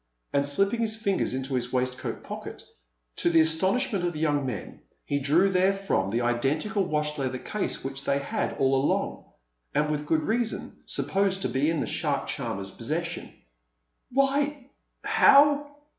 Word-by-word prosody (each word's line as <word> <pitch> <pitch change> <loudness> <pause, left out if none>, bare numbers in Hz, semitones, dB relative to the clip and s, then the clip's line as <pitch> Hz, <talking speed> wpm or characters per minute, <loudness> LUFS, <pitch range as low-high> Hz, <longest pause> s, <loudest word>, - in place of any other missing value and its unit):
And 140 - +3
slipping 195 +10 +1
his 220 -1 0
fingers 200 - 0
into 130 +1 -4
his 125 -1 -1
waistcoat 125 0 -2
pocket, - - -8 0.5
to - - +2
the 165 -1 +5
astonishment 190 +7 +1
of 175 0 0
the 155 - -6
young 145 -3 +1
men 105 -8 -6 0.2
he 145 - 0
drew 150 +8 +4
therefrom 190 - +1
the 115 +4 0
identical 140 - 0
wash 150 -2 -1
leather 130 -1 -1
case 210 +10 -3
which 135 +1 -4
they 140 - +1
had 140 - -2
all 135 0 +2
along, - - -1 0.5
and 150 0 +2
with 150 0 -3
good 155 0 +2
reason, 230 0 -2
supposed 195 -1 0
to - - 0
be 140 +4 +1
in 165 -3 0
the - - -1
shark - - -1
charmer's 95 0 -3
possession. - - -3 0.8
"Why 275 +1 0 0.3
how 290 +1 +5
160 Hz, 160 wpm, -27 LUFS, 135-200 Hz, 0.8 s, the